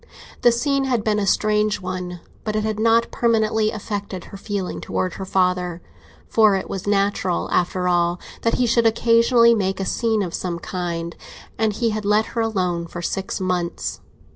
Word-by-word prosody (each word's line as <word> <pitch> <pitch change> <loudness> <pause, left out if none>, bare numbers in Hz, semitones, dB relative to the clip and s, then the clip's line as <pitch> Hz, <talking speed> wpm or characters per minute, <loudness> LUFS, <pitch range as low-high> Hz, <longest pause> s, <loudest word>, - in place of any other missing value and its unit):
The 240 - +6
scene 275 +3 +1
had 245 -5 0
been 210 -1 +1
a 200 - -1
strange 210 +1 +2
one, 180 -1 -5 0.2
but 215 -1 -2
it 215 - 0
had 215 -1 -2
not 230 +1 +3
permanently 220 -2 +2
affected 205 -4 -5
her - - -11
feeling 200 -2 -4
towards 185 -2 -2
her 190 - -5
father, 180 -2 0 0.5
for 215 -3 +4
it 190 - -3
was 195 0 -5
natural, 200 -3 +1
after 180 +1 +1
all, 175 0 +2 0.2
that 230 - +1
he 250 - +2
should 235 0 +3
occasionally 230 +1 +4
make 195 -3 -1
a 195 - -1
scene 220 0 +1
of 175 -3 -5
some 175 -2 -3
kind, 170 -3 -4 0.4
and 220 -1 +1
he 230 +2 0
had 215 0 -3
let 210 +2 +3
her 230 - 0
alone 180 -6 -1
for 175 +1 -7
six 195 +2 -3
months. 180 -2 -2
205 Hz, 180 wpm, -22 LUFS, 180-225 Hz, 0.5 s, The